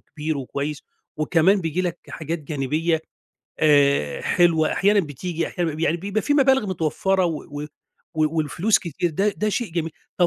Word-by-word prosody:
كبير 155 -1 -4
وكويس، 140 +2 -4 0.3
وكمان 165 +6 +3
بييجي 165 +2 -1
لك 175 -1 -2
حاجات 160 +2 -4
جانبية، 155 +3 -1 0.6
آآ، 140 - +3
حلوة، 165 -3 +3
أحيانًا 205 +1 +3
بتيجي، 165 +1 -4
أحيانًا 175 -2 -2
ما 150 - -6
ب - - -7
يعني 165 0 +2
بيبقى 200 +4 -2
في 290 - +1
مبالغ 265 -5 +4
متوفرة 185 +2 0
و 160 -3 -2 0.2
و - - -5 0.5
و 155 +1 +1
والفلوس 165 +8 +2
كتير، 170 0 -2
ده 195 +7 +1
ده 215 - 0
شيء 220 -2 -2
جميل، 165 -1 -2 0.3
طب 175 - +4
165 Hz, 170 wpm, -23 LUFS, 155-185 Hz, 0.6 s, مبالغ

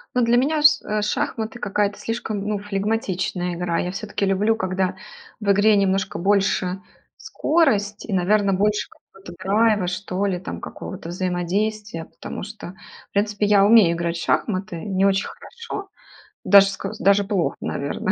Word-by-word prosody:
Ну 250 - +3
для 235 +1 +3
меня 300 +4 +1
ш 300 0 +5
э, 210 0 -1
шахматы- 220 +3 -2
какая-то 205 -1 -1
слишком, 225 -2 -4
ну, 210 -1 -1
флегматичная 195 -3 -2
игра. 170 -1 -1
Я 180 - -2
всё-таки 200 +1 -3
люблю, 200 +3 +2
когда 185 -2 -1 0.4
в 210 -2 -2
игре 205 +2 +4
немножко 195 -1 0
больше 195 -1 +1 0.4
скорость. 215 -11 0
И, - - -7
наверно, 195 +2 +2
больше 210 +2 0
какого-то 195 -2 -15
драйва, 205 0 +2
что 185 +1 -2
ли, 190 -3 0
там 180 - -6
какого-то 185 -3 -8
взаимодействия. 185 +1 -2
Потому - - -8
что, 210 -3 -9 0.4
в - - -62
принципе, 205 0 0
я 200 -1 +5
умею 205 -6 +6
играть 170 0 -2
в 170 - -5
шахматы 195 -3 -1
не 195 -2 +1
очень 195 0 +2
хорошо, 460 -4 -8 0.6
даже 200 +1 +7
ск 195 0 -4
даже 200 -3 +3
плохо, 195 -4 -1
наверно. 140 +6 -2
200 Hz, 155 wpm, -22 LUFS, 185-215 Hz, 0.6 s, даже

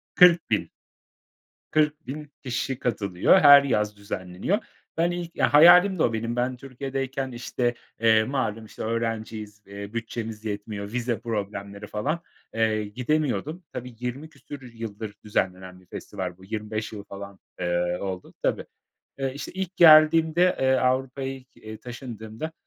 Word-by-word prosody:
40.000. 175 -2 +5 1.0
40.000 150 -1 -1
kişi 130 0 -2
katılıyor, 100 - +3
her 145 -1 +9
yaz 105 -6 0
düzenleniyor. 100 - -2 0.4
Ben 170 +1 +2
ilk 175 -1 -6
hayalimdi 175 +4 +7
o 115 - +2
benim. 115 +2 -2
Ben 125 +1 -1
Türkiye'deyken 135 0 -4
işte, 120 0 -1 0.3
eee, 110 -1 +5
malum 115 -3 -2
işte 110 - -8
öğrenciyiz, 110 -2 -3
eee, 100 +1 -8
bütçemiz 110 -1 -5
yetmiyor, 105 -1 -5
vize 120 -2 -1
problemleri 100 -2 -5
falan, 145 +12 -2 0.3
eee, 110 -1 +1
gidemiyordum. 150 - -1
Tabii 125 -1 -7
20 125 +5 -5
küsur 140 -1 -11
yıldır 115 -3 -7
düzenlenen 95 -3 -2
bir 90 - -23
festival 90 -1 -6
bu. 95 - -15
25 110 +1 -4
yılı 105 -2 -7
falan, 100 -1 -9 0.2
eee, 90 0 0
oldu 95 -2 -5
Tabii, - - 0 0.5
eee, 135 -1 -1
işte 145 +4 -7
ilk 190 -1 -4
geldiğimde, 160 +2 +6
eee, 130 0 +3
Avrupa'ya 130 +1 0
ilk, 130 -1 -14
eee, 110 0 -9
taşındığımda, 120 +3 -7
120 Hz, 130 wpm, -25 LUFS, 105-140 Hz, 1.0 s, her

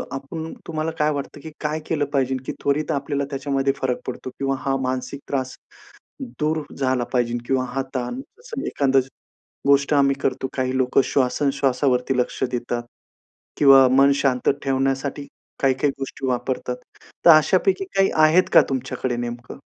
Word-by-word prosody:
आपण 160 +4 -6
तुम्हाला 160 0 -2
काय 150 0 +3
वाटतं 145 +1 -5
की 160 - -8
काय 155 +1 -1
केलं 150 -3 0
पाहिजे 135 -1 +1
की - - -3
त्वरित 145 +2 0
आपल्याला 140 -1 -1
त्याच्यामध्ये 135 -1 0
फरक 130 -2 -1
पडतो? 130 0 -5
किंवा 135 0 0
हा 135 -1 +1
मानसिक 130 +1 -3
त्रास 130 -2 -2 0.9
दूर 155 +1 +1 0.2
झाला 130 -2 +1
पाहिजे 120 -1 0
किंवा 130 0 +1
हा 135 - 0
ताण 130 - -3 0.2
असं 475 -1 -6
एखाद 135 -1 +1 0.7
गोष्ट 140 +1 +4
आम्ही 140 -1 +4
करतो, 130 0 -1
काही 130 0 0
लोकं 130 +1 +3
श्वासन 140 +1 +1
श्वासावरती 135 -1 +1
लक्ष 125 - -1
देतात. 120 -1 -3 0.7
किंवा 135 -2 +7
मन 135 +1 +6
शांत 130 -3 0
ठेवण्यासाठी 135 +1 -1 0.4
काही-काही 135 +1 +2
गोष्टी 135 0 -5
वापरतात. 125 0 -2 0.5
तर - - +11
अशापैकी 185 - +4
काही 195 0 +4
आहेत 160 +4 +5
का - - +9
तुमच्याकडे 130 -1 -2
नेमकं? 120 0 -6
135 Hz, 150 wpm, -22 LUFS, 130-145 Hz, 0.9 s, तर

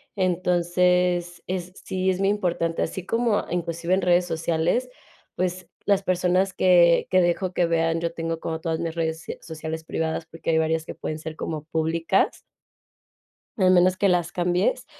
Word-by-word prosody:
entonces, 180 -1 +1
es 180 -1 -3
sí 190 -1 -1
es 185 0 0
muy 195 - +2
importante, 175 -5 0
así 180 +2 -3
como, 230 -1 +1
inclusive 170 0 -1
en 190 - +2
redes 180 0 +3
sociales, 170 +8 0 0.5
pues, 185 0 -3 0.2
las 200 -1 +2
personas 185 +1 +1
que 175 -2 +4
que 185 0 +4
dejo 180 +1 0
que 175 - +2
vean 165 0 +1
yo 170 0 -1
tengo 165 0 -3
como 160 -1 -3
todas 160 0 -2
mis 165 -1 -3
redes 160 -1 -2
se - - -7
sociales 160 0 -6
privadas 160 0 -2
porque 165 0 -7
hay 160 - +3
varias 160 0 +1
que - - -7
pueden 155 0 -5
ser 155 0 -7
como 155 -2 -4
públicas. 160 +1 0 1.2
Al 185 -3 +4
menos 180 0 +5
que 200 +1 +2
las 175 -2 +1
cambies. 180 - 0
175 Hz, 170 wpm, -24 LUFS, 165-185 Hz, 1.2 s, menos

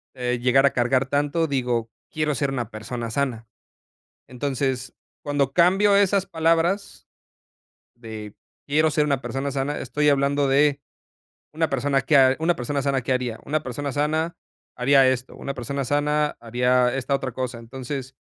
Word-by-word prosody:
eh, 125 -1 -2
llegar 130 +2 +4
a 140 - +3
cargar 125 +2 +1
tanto 145 +4 0
digo, 125 -5 -1 0.2
quiero 155 -1 0
ser 140 +1 0
una 120 -5 -3
persona 115 +2 -5
sana. 120 -3 -2 0.8
Entonces, 130 -1 -2 0.3
cuando 145 -2 0
cambio 190 +5 +4
esas 200 -1 +3
palabras 165 +4 0 0.9
de 110 -3 -9 0.3
quiero 155 +2 +2
ser 150 0 +2
una 140 -3 0
persona 135 +1 -3
sana, 140 +2 -2
estoy 150 +4 0
hablando 140 0 +2
de 145 +1 +3 0.7
una 160 +1 0
persona 135 +1 +1
que 145 +4 +3
ha 130 -1 +5
una 165 +2 +2
persona 140 +2 -2
sana, 135 -1 0
¿qué 130 - -1
haría? 125 -3 -2
Una 155 +2 -1
persona 140 +3 -4
sana, 155 +4 -1 0.4
haría 135 +1 +5
esto, 130 0 -1
una 140 - -5
persona 135 +2 -4
sana 150 +2 +1
haría 125 +2 +1
esta 135 +1 -2
otra 135 -1 -3
cosa. 125 -1 -4
Entonces, 130 +2 -7
135 Hz, 155 wpm, -23 LUFS, 125-150 Hz, 0.9 s, ha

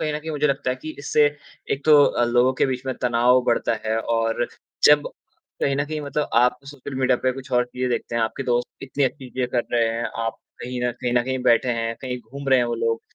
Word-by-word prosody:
कहीं 155 - -1
न - - -2
कहीं 160 +1 -6
मुझे 150 -1 +1
लगता 140 -2 0
है 125 - -2
कि 155 - -6
इससे 145 +1 +2 0.5
एक 140 - -4
तो 150 -2 +7
अ, 120 - +2
लोगों 120 +2 +3
के - - +5
बीच 130 -1 -3
में 130 - -1
तनाव 125 +1 +4
बढ़ता 120 0 +1
है 110 0 +1
और 115 +1 0 0.4
जब 150 0 +6 0.5
कहीं 140 - +2
न 145 - 0
कहीं 155 +1 -4
मतलब 145 0 -2
आप 125 +1 +4
सोशल 140 -1 -9
मीडिया 130 -1 +3
पे 130 - +2
कुछ 135 +1 -10
और 125 0 +3
चीज़ें 125 +1 -3
देखते 120 - -2
हैं 115 - +1
आपके 110 +4 -2
दोस्त 120 -1 0
इतनी 135 +1 -1
अच्छी 130 0 -3
चीज़ें 125 -1 -2
कर 120 - +2
रहे 115 -1 +3
हैं 115 +1 -2 0.2
आप 115 - -3 0.2
कहीं 125 0 -5
न 125 - +2
कहीं 120 - -1
न 120 0 +3
कहीं 130 +1 -2
बैठे 120 +2 +3
हैं, 115 0 -2
कहीं 125 -1 -4
घूम 135 +5 -8
रहे 130 -1 +5
हैं 120 - +2
वो 120 - -1
लोग 115 0 -1
125 Hz, 250 wpm, -23 LUFS, 120-140 Hz, 0.5 s, तो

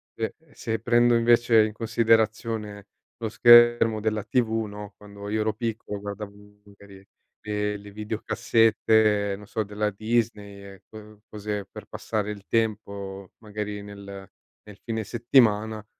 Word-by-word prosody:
se 110 -1 -3 0.2
se 110 -2 -3
prendo 120 +1 +3
invece 115 -1 +4
in 105 - -5
considerazione 110 -2 0 0.3
lo 115 - -4
schermo 120 -1 +6
della 110 -1 -1
TV, 110 0 0
no, 105 0 -9
quando 100 0 -11
io 110 +1 -1
ero 110 0 +1
piccolo 110 -2 -4
guardavo 100 0 -7 0.3
magari 100 -1 -16 0.4
le 105 0 -2
le 100 0 -10
videocassette, 110 -1 +1
non 105 0 -13
so, 110 - -2
della 105 +1 -2
Disney, 100 -3 -3
co 105 -1 -13
cose 105 -1 -5
per - - -10
passare 105 -1 -3
il 100 -1 -10
tempo 100 -4 -3
magari 105 -1 -6
nel 100 0 -10 0.6
nel 105 -1 -13
fine 110 -2 -3
settimana, 110 -2 +2
105 Hz, 130 wpm, -25 LUFS, 100-115 Hz, 0.6 s, schermo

